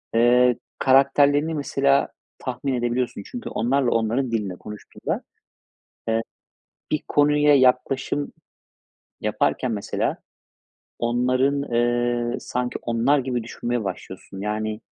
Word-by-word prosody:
ııı, 125 Hz, +1 st, +5 dB, 0.2 s
karakterlerini 145 Hz, +3 st, +4 dB
mesela 140 Hz, -1 st, +2 dB, 0.3 s
tahmin 130 Hz, +1 st, -3 dB
edebiliyorsun. 120 Hz, -3 st, -1 dB
Çünkü 245 Hz, -2 st, -7 dB
onlarla 125 Hz, +2 st, +1 dB
onların 115 Hz, +3 st, 0 dB
dilinde 105 Hz, -5 st, -2 dB
konuştuğunda, 105 Hz, +3 st, -6 dB, 0.9 s
ııı, 115 Hz, 0 st, +2 dB, 0.7 s
bir 155 Hz, -, 0 dB
konuya 150 Hz, 0 st, +4 dB
yaklaşım 130 Hz, +2 st, +2 dB, 0.9 s
yaparken 125 Hz, -, 0 dB
mesela 105 Hz, -2 st, -2 dB, 0.8 s
onların, 130 Hz, +4 st, +1 dB
ııı, 120 Hz, -1 st, 0 dB
sanki 125 Hz, 0 st, -3 dB
onlar 120 Hz, +5 st, +2 dB
gibi 125 Hz, -2 st, -2 dB
düşünmeye 120 Hz, 0 st, -3 dB
başlıyorsun 95 Hz, 0 st, -7 dB
yani 105 Hz, +1 st, -3 dB
125 Hz, 95 wpm, -23 LUFS, 115-140 Hz, 0.9 s, ııı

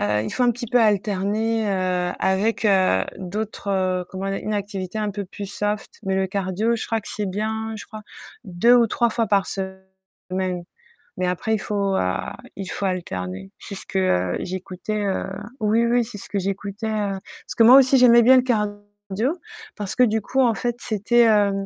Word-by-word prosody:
heu, 105 Hz, +1 st, +1 dB
il -, -, -4 dB
faut 255 Hz, -, 0 dB
un 245 Hz, -, +5 dB
petit 240 Hz, +1 st, -5 dB
peu 245 Hz, +2 st, +3 dB
alterner, 210 Hz, +1 st, +1 dB
heu, 180 Hz, -2 st, 0 dB
avec, 205 Hz, +4 st, +1 dB
heu, 185 Hz, -, +3 dB
d'autres, 205 Hz, +2 st, -5 dB
heu, 185 Hz, -2 st, 0 dB
comment 195 Hz, +1 st, -4 dB
dire? 195 Hz, -, -2 dB
Une 215 Hz, -, -2 dB
activité 200 Hz, -1 st, -4 dB
un 210 Hz, -1 st, -1 dB
peu 205 Hz, -1 st, -4 dB
plus 200 Hz, +2 st, -8 dB
soft 210 Hz, +1 st, -4 dB
mais 190 Hz, 0 st, -1 dB
le 190 Hz, 0 st, +1 dB
cardio, 195 Hz, +4 st, -1 dB
je 230 Hz, -, -3 dB
crois 225 Hz, -1 st, -1 dB
que -, -, -12 dB
c'est 210 Hz, -1 st, -3 dB
bien 220 Hz, +2 st, -3 dB
je -, -, -8 dB
crois, 215 Hz, -1 st, -9 dB, 0.4 s
2 205 Hz, +5 st, +3 dB
ou 235 Hz, -2 st, +5 dB
3 235 Hz, +2 st, +2 dB
fois 230 Hz, 0 st, 0 dB
par 200 Hz, -2 st, +2 dB
semaine 190 Hz, -1 st, -6 dB, 0.5 s
mais 185 Hz, -, 0 dB
après 180 Hz, +5 st, -1 dB
il -, -, -2 dB
faut, 200 Hz, -1 st, -1 dB
a 90 Hz, -, -1 dB, 0.2 s
il 195 Hz, -, -5 dB
faut 200 Hz, -, -3 dB
alterner. 95 Hz, -, -4 dB
C'est 200 Hz, -, -8 dB
ce -, -, -10 dB
que, 190 Hz, -, -1 dB
heu, 90 Hz, -, +1 dB
j'écoutais 185 Hz, +3 st, -4 dB
heu, 195 Hz, -1 st, -1 dB, 0.3 s
oui, 220 Hz, +2 st, +2 dB
oui, 240 Hz, +1 st, +3 dB
c'est 220 Hz, -2 st, -9 dB
ce -, -, -11 dB
que 205 Hz, -, -2 dB
j'écoutais, 200 Hz, +2 st, -3 dB
heu 205 Hz, -3 st, -1 dB, 0.3 s
parce -, -, -6 dB
que 230 Hz, -, +6 dB
moi 245 Hz, +4 st, +9 dB
aussi 270 Hz, 0 st, +6 dB
j'aimais 240 Hz, -2 st, +7 dB
bien 255 Hz, +3 st, +7 dB
le 255 Hz, -, +4 dB
cardio 210 Hz, -5 st, 0 dB, 1.0 s
parce 205 Hz, -3 st, -5 dB
que 250 Hz, -, +5 dB
du 220 Hz, -2 st, +2 dB
coup 265 Hz, +6 st, 0 dB
en 235 Hz, -3 st, +3 dB
fait 240 Hz, 0 st, -2 dB
c'était 230 Hz, +2 st, +2 dB
heu, 205 Hz, -2 st, +4 dB
205 Hz, 200 wpm, -23 LUFS, 190-220 Hz, 1.0 s, moi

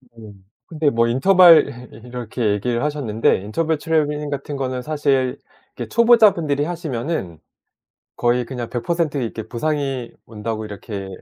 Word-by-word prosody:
네. 110 Hz, -2 st, -12 dB, 0.3 s
근데 155 Hz, -3 st, 0 dB
뭐 115 Hz, -2 st, +2 dB
인터벌 160 Hz, -3 st, +5 dB
이 115 Hz, +3 st, -13 dB
이렇게 120 Hz, -2 st, -2 dB
얘기를 120 Hz, +4 st, -1 dB
하셨는데 140 Hz, -8 st, +1 dB
인터벌 155 Hz, +11 st, -1 dB
트레이닝 150 Hz, -1 st, -1 dB
같은 140 Hz, 0 st, -5 dB
거는 130 Hz, -2 st, -3 dB
사실 140 Hz, -3 st, 0 dB, 0.4 s
이렇게 -, -, -6 dB
초보자분들이 210 Hz, -11 st, +4 dB
하시면은 150 Hz, -, -4 dB, 0.8 s
거의 120 Hz, +1 st, +1 dB
그냥 120 Hz, -1 st, -6 dB
100% 155 Hz, +4 st, -1 dB
이렇게 110 Hz, -3 st, -4 dB
부상이 135 Hz, -1 st, -2 dB, 0.2 s
온다고 110 Hz, 0 st, -5 dB
이렇게 100 Hz, -1 st, -7 dB
130 Hz, 320 characters per minute, -20 LUFS, 115-155 Hz, 0.8 s, 인터벌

